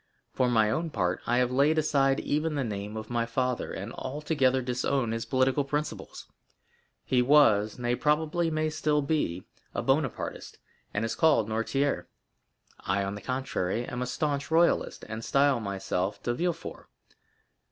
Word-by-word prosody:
For 125 -1 +2
my 110 -3 +3
own 165 +8 -1
part, 90 - -1
I 120 - +2
have 125 0 +2
laid 145 +5 +3
aside 140 -3 +2
even 150 +1 -1
the 140 - 0
name 105 -1 -4
of 110 +1 -7
my 115 -1 0
father, 125 +1 -1
and 100 +4 -6
altogether 135 -1 0
disown 125 0 0
his 115 +1 -3
political 130 +2 +2
principles. 150 +2 -4 0.8
He 125 -1 +2
was—nay, 120 -3 +4
probably 160 +3 +1
may 155 0 0
still 150 -1 +1
be—a 140 - -3
Bonapartist, - - -1 0.3
and 105 +2 -1
is 115 - -2
called 150 -9 +3
Noirtier; 115 -2 0 0.7
I, 100 +1 -1
on 100 0 -3
the 105 - -7
contrary, 120 -3 -2
am 125 0 -5
a 125 - -2
staunch 140 +2 -2
royalist, 165 +2 +2
and 110 +1 -6
style 140 -1 +3
myself 95 -2 -3
de 120 - 0
Villefort. 170 +4 -3
125 Hz, 150 wpm, -28 LUFS, 110-150 Hz, 0.8 s, was—nay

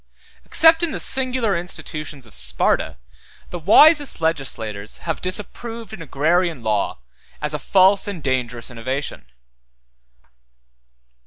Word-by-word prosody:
Except 325 0 +5
in 340 - 0
the - - -4
singular 255 -5 +1
institutions 155 -5 -5
of 110 - -13
Sparta, - - +1 0.5
the 175 - -5
wisest 290 - +5
legislators 120 -10 -2
have 165 -2 -3
disapproved 220 +4 -4
an 195 - -9
agrarian 165 0 0
law 105 -2 -1 0.4
as 150 0 -3
a 150 - -2
false 195 +3 +4
and 190 -7 -6
dangerous 125 -3 -2
innovation. 130 - -5
165 Hz, 110 wpm, -21 LUFS, 130-210 Hz, 0.5 s, Except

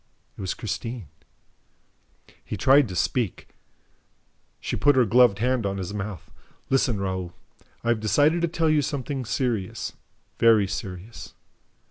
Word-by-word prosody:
It - - -9
was 95 - -2
Christine. 115 - -5 1.3
He 105 - -5
tried 135 +5 +5
to 90 - -7
speak. 115 +2 -1 1.1
She - - -3
put 145 -1 +4
her 130 -2 +5
gloved 120 -1 +5
hand 125 +2 +1
on 100 -1 -2
his 95 +1 -5
mouth. 100 -4 -6 0.4
"Listen, 130 -5 +2
Raoul. 95 -2 -3 0.5
I 115 - -1
have 120 -2 +2
decided 145 - +3
to 170 - +2
tell 165 0 0
you 155 -1 +4
something 135 -1 -3
serious, 115 -5 -2 0.5
very 115 -3 +5
serious 95 +3 -7
115 Hz, 135 wpm, -25 LUFS, 100-130 Hz, 1.3 s, tried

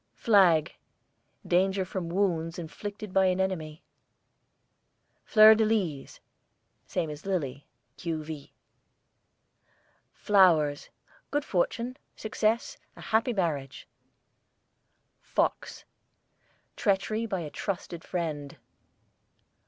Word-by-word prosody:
FLAG, 185 - +4 0.7
danger 190 +2 +2
from 185 -2 -4
wounds 170 -3 0
inflicted 200 +4 -7
by 190 -1 +4
an 185 0 +1
enemy. 160 -5 -3 1.4
FLEUR 215 0 +8
DE 220 0 +2
LYS, 190 -11 -1 0.7
same 165 -4 -2
as 150 0 -9
LILY 140 -8 -3 0.3
(q.v.). 155 -3 -5 1.6
FLOWERS, 165 -8 +3 0.4
good 290 0 -1
fortune, 235 +7 -1 0.2
success; 225 - -1 0.2
a - - -12
happy 225 +3 +1
marriage. 155 - -3 1.3
FOX, - - -2 0.9
treachery 215 +3 0
by 190 -4 -2
a 150 -3 -6
trusted 175 -3 -5
friend. 155 -5 -4
185 Hz, 85 wpm, -28 LUFS, 160-205 Hz, 1.6 s, FLEUR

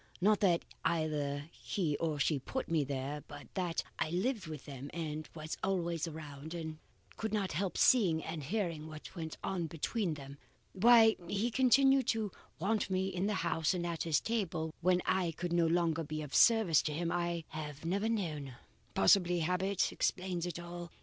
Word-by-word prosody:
Not 205 +3 +4
that 175 -4 +3 0.2
either 150 -2 -1
he 165 -7 -2
or 160 -3 -1
she 145 0 +2
put 260 - -4
me 160 -3 +2
there, 140 +2 -3
but 145 0 -11
that 180 -3 -1 0.2
I - - +1
lived 190 +3 -1
with 155 -4 -7
them 140 0 -7
and 155 -2 -4
was 155 0 -5
always 170 -4 0
around, 155 0 -7
and 160 -2 -5 0.4
could 220 -1 -2
not 205 -3 0
help 185 +4 -2
seeing 180 -11 +4
and 160 -1 -4
hearing 165 -1 -2
what 155 +3 -10
went 160 -2 -5
on 175 -4 -1
between 165 +3 -2
them. 140 -1 -10 0.3
Why 225 +2 +6
he 205 +6 0
continued 270 +1 +5
to 220 -3 0 0.3
want 210 +5 0
me 190 0 0
in 185 +1 -1
the 210 - 0
house 160 +3 +1
and 175 -1 -2
at 170 -2 -3
his 160 -3 +2
table, 175 -8 -2
when 180 +1 +3
I 185 -3 +1
could 175 +2 -3
no 170 -1 +4
longer 165 -1 +1
be 155 0 -4
of 145 - -9
service 220 - +6
to 150 - -2
him, 170 +2 -1
I 170 -1 -1
have 150 -1 -6
never 200 +6 0
known. 155 - -2 0.4
Possibly 175 - +4
habit 180 +3 +1
explains 180 -2 -1
all. 175 0 -7
170 Hz, 175 wpm, -33 LUFS, 155-190 Hz, 0.4 s, Why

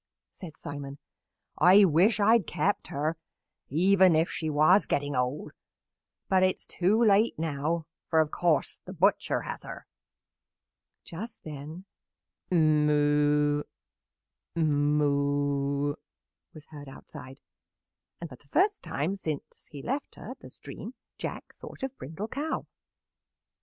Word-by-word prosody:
said 160 -4 -11
Simon. 145 -1 -7 0.6
"I 195 +3 +7
wish 185 +7 +3
I 205 +2 +4
had 230 -8 +2
kept 180 +5 -1
her 155 +3 -2 0.5
even 185 +3 +4
if 160 +2 +1
she 160 - -3
was 155 +7 +4
getting 145 0 -1
old; 125 +3 -2 0.8
but 190 -1 +3
it 185 0 +3
is - - -10
too 205 +6 +1
late 210 +2 +3
now, 160 +1 -2 0.2
for, 160 - +3
of 155 -1 +2
course, 170 -4 0
the 185 - -8
butcher 190 +3 +1
has - - -6
her." - - -9 1.2
Just 220 +7 -8
then, 155 +4 -8 0.6
"Moo, 150 -2 +3 0.9
moo!" 145 -2 +1 0.6
was 155 - -13
heard 145 -3 -10
outside, 135 0 -12 0.8
and 170 - -6
for 130 -5 -12
the 145 - -26
first 405 - +1
time 160 +8 -2
since 155 -7 -6
he 140 -2 -9
left 275 +3 -4
her - - -9
at - - -10
the - - -12
stream - - -10 0.2
Jack - - -6
thought - - -11
of 270 0 -4
Brindle 165 +10 -6
Cow. 300 +3 -3
155 Hz, 130 wpm, -28 LUFS, 145-185 Hz, 1.2 s, I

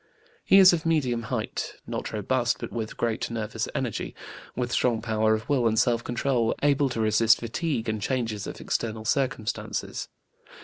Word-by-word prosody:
He 195 - +6
is 190 -2 +9
of 165 -3 0
medium 140 -8 +1
height, - - -3
not - - -4
robust, 120 +3 0
but - - -6
with 110 -2 -4
great 115 -2 -1
nervous 110 -2 -3
energy, - - -3 0.4
with 125 0 -2
strong 120 -3 +2
power 110 -1 +2
of 110 +1 -6
will 130 -5 +2
and 110 0 +1
self 115 0 +2
control, 120 -1 0
able 145 -1 +3
to 120 - -4
resist 110 +1 +4
fatigue 120 +1 -2
and 110 -1 -2
changes 115 -3 -2
of - - -7
external 110 -1 -2
circumstances. 125 -3 -2
115 Hz, 165 wpm, -26 LUFS, 110-130 Hz, 0.4 s, is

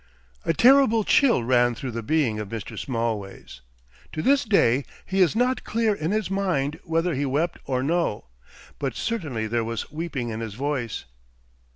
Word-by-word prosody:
A - - +3
terrible 240 - +5
chill 240 - +4
ran 120 0 +3
through 130 +2 -5
the 115 0 -4
being 125 -4 +1
of 105 -2 -5
Mr. 110 -2 -6
Smallways. 110 - -4 0.5
To 155 - -3
this 280 +1 +4
day 140 - +3 0.2
he 190 0 0
is 180 +2 +4
not 250 +2 +1
clear 225 -1 +1
in 160 -5 -3
his 215 +2 0
mind 170 -7 0
whether 165 +2 0
he 140 +1 -1
wept 150 +5 -1
or 130 -1 -1
no, 165 - 0 0.5
but 135 -5 -2
certainly 145 - -2
there 115 +1 0
was 115 +3 -4
weeping 150 -6 -4
in 110 0 -4
his 110 -3 -5
voice. 130 -3 -3
145 Hz, 170 wpm, -25 LUFS, 115-190 Hz, 0.5 s, terrible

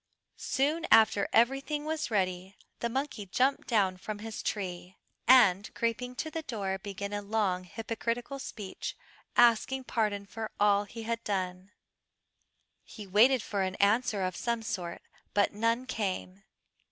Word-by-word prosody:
Soon 305 +5 0
after 220 -2 +5
everything 275 +5 +2
was 315 -2 -2
ready 190 -2 -1 0.2
the 235 - -1
monkey 260 -5 -3
jumped 260 +8 +1
down 195 -6 +2
from 205 +3 -5
his 220 +1 -6
tree, 185 -2 -4 0.3
and 210 -6 +6
creeping 245 +2 -2
to 315 +4 -4
the 325 - -3
door 200 -9 -3
began 200 0 -5
a 205 - -2
long 200 -3 0
hypocritical 230 +6 -4
speech, 205 -7 -6 0.4
asking 240 +3 +4
pardon 210 -5 -1
for 220 +2 -6
all 205 0 +4
he 225 +2 -8
had 230 +1 -3
done. 185 -1 -3 1.1
He 210 - -10
waited 220 +6 +4
for 200 -2 -2
an 190 0 -1
answer 210 0 +2
of 185 -1 -2
some 235 -1 -2
sort, 180 -6 -4 0.3
but 205 -1 +3
none 230 +4 0
came. 195 -4 -4
215 Hz, 140 wpm, -30 LUFS, 195-240 Hz, 1.1 s, and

